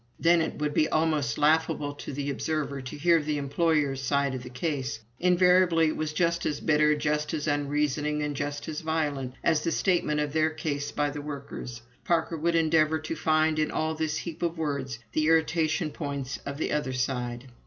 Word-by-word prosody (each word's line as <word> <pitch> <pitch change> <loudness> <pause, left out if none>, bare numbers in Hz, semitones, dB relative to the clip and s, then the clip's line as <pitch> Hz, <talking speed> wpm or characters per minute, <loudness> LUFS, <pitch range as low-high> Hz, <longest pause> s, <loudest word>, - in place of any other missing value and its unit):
"Then 170 0 +4
it 160 - -3
would 150 0 -1
be 155 - +2
almost 155 -6 +1
laughable 150 -1 +2
to 145 - -8
the 140 +1 -3
observer 140 -1 -2
to 130 +3 -7
hear 165 +2 +4
the 150 0 -1
employer's 145 -1 +1
side 140 0 +1
of 130 - -4
the - - -9
case. 135 -1 -3 0.2
Invariably 180 -2 +4
it - - -3
was 155 -1 -2
just 170 +2 +1
as 150 - -1
bitter, 150 0 +3
just 150 +1 -1
as 150 - -3
unreasoning, 150 0 0
and 150 -1 -2
just 145 +2 -4
as 155 -1 -4
violent, 145 -5 -2
as 160 -3 +2
the 165 - 0
statement 165 -5 +1
of 150 -1 -1
their 155 0 +3
case 145 -2 -3
by 145 0 0
the 145 0 -5
workers. 140 -5 -7 0.2
Parker 165 -1 +1
would 170 +2 0
endeavor 160 -1 +3
to 155 +1 -5
find, 155 0 +2
in 155 - +1
all 160 0 -1
this 155 -1 -2
heap 170 -3 -6
of 170 -1 -1
words, 140 -6 -2
the 155 +5 +1
irritation 160 -1 +2
points 140 -4 -4
of 140 0 -4
the 160 - -2
other 150 -3 -1
side. 125 -1 -2
150 Hz, 195 wpm, -27 LUFS, 145-160 Hz, 0.2 s, Then